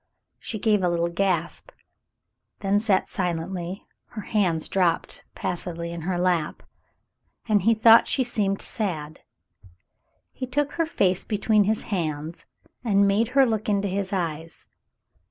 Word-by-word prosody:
She 220 - -5
gave 210 -1 +2
a 180 - +2
little 170 0 0
gasp, 170 -2 -1 0.9
then 200 +1 +2
sat 205 -3 +2
silently, 180 +1 -3 0.2
her 215 - -8
hands 180 -7 0
dropped 175 -3 0
passively 170 -1 -4
in 170 -1 -6
her 180 +2 -2
lap, 175 -3 0 0.8
and 210 -3 +3
he 225 +5 +3
thought 225 +1 +7
she 260 - +1
seemed 200 -5 -1
sad. 155 -8 -3 1.1
He 255 - -6
took 285 +3 0
her 330 -1 -1
face 185 - +1
between 210 -1 +2
his 215 +2 0
hands 155 -2 -3 0.4
and 200 -4 +3
made 205 +3 +2
her 270 - +7
look 220 -3 -1
into 200 -1 +1
his 195 0 -2
eyes. 165 -3 -3
195 Hz, 135 wpm, -25 LUFS, 170-215 Hz, 1.1 s, thought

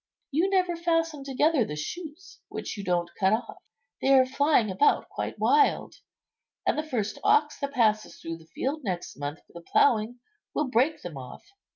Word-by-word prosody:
You 330 +7 +2
never 365 -3 +2
fasten 330 -3 0
together 275 +1 +2
the 150 - -5
shoots 330 - -7
which - - -5
you 200 - -6
don't 175 -2 -1
cut 190 +1 +3
off, 220 - -3 0.4
they 270 - +2
are 260 -1 +6
flying 260 -5 +2
about 190 +11 +3
quite - - -4
wild, 435 -1 +2 0.7
and - - +2
the 305 - 0
first 240 -9 -3
ox 435 +2 +3
that 280 -1 -3
passes 215 -4 +1
through 165 0 -6
the 160 -1 -18
field 275 - -3
next 180 -5 -4
month 145 +2 -5
for - - -25
the 170 - -9
ploughing 230 +5 +2 0.4
will 300 -3 0
break 265 +7 +2
them 170 -5 -7
off." 125 -1 -10
255 Hz, 180 wpm, -27 LUFS, 190-315 Hz, 0.7 s, are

